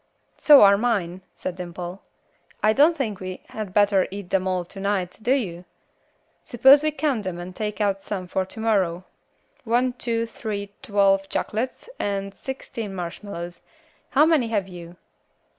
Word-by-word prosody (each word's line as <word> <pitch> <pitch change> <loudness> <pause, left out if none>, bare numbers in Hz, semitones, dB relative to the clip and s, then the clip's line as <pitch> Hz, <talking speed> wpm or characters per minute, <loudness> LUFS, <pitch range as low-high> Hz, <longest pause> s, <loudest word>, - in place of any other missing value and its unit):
"So 295 -2 +8
are 200 0 +6
mine," 190 -7 -1
said 185 - -5
Dimple. 180 +1 -7 0.6
"I 215 0 +5
don't 310 +6 +4
think 215 -8 -2
we 185 -1 -6
had 215 -3 -6
better 200 -1 +3
eat 195 -1 -8
them 190 -1 +1
all 185 -1 -1
to 195 - -12
night, 195 -2 -2
do 240 - 0
you? 180 -10 -3 0.8
Suppose 265 +4 +6
we 310 - +1
count 295 -7 -1
them 185 -3 -4
and 180 +1 -8
take 210 +1 -4
out 200 -2 0
some 190 -3 -5
for 190 +1 -1
to 190 +4 -11
morrow. 190 -6 +1 0.6
One, 245 +2 +1
two, 230 -2 -2
three, 210 -3 -5
twelve 195 -5 +2
chocolates, 235 - -3
and 195 -1 -2
sixteen 230 -6 -6
marshmallows. 175 0 -6 0.5
How 290 +3 +5
many 315 -7 +3
have 205 -4 -1
you?" 175 -2 -10
200 Hz, 160 wpm, -24 LUFS, 185-230 Hz, 0.8 s, So